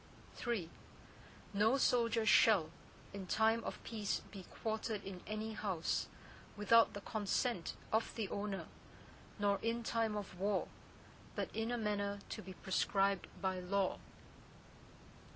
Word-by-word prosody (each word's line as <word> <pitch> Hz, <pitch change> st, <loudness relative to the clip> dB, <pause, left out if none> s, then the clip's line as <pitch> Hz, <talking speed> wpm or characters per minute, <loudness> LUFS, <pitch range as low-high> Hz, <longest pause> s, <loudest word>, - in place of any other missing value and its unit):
III 220 Hz, -9 st, 0 dB, 0.9 s
No 215 Hz, +6 st, +4 dB
soldier 235 Hz, -3 st, +3 dB
shall, 200 Hz, -7 st, +6 dB, 0.4 s
in 195 Hz, -2 st, -6 dB
time 225 Hz, +3 st, +3 dB
of -, -, -4 dB
peace 215 Hz, -3 st, -2 dB
be 195 Hz, -3 st, -8 dB
quartered 220 Hz, -1 st, -2 dB
in 190 Hz, -2 st, -7 dB
any 215 Hz, +1 st, -3 dB
house, 195 Hz, -6 st, -1 dB, 0.5 s
without 225 Hz, +3 st, +5 dB
the 205 Hz, -, -5 dB
consent 210 Hz, -1 st, -1 dB, 0.2 s
of 220 Hz, +1 st, +1 dB
the 220 Hz, -4 st, -1 dB
owner, 200 Hz, -1 st, -3 dB, 0.7 s
nor 205 Hz, -1 st, +2 dB
in 230 Hz, +1 st, 0 dB
time 225 Hz, -2 st, 0 dB
of 190 Hz, -3 st, -6 dB
war, 200 Hz, 0 st, +1 dB, 0.7 s
but -, -, -3 dB
in 225 Hz, +1 st, 0 dB
a 245 Hz, -, 0 dB
manner 205 Hz, -2 st, 0 dB
to -, -, -4 dB
be 190 Hz, 0 st, -8 dB
prescribed 195 Hz, +1 st, +1 dB, 0.2 s
by 190 Hz, -1 st, +1 dB
law. 190 Hz, +1 st, 0 dB
210 Hz, 130 wpm, -37 LUFS, 195-225 Hz, 0.9 s, shall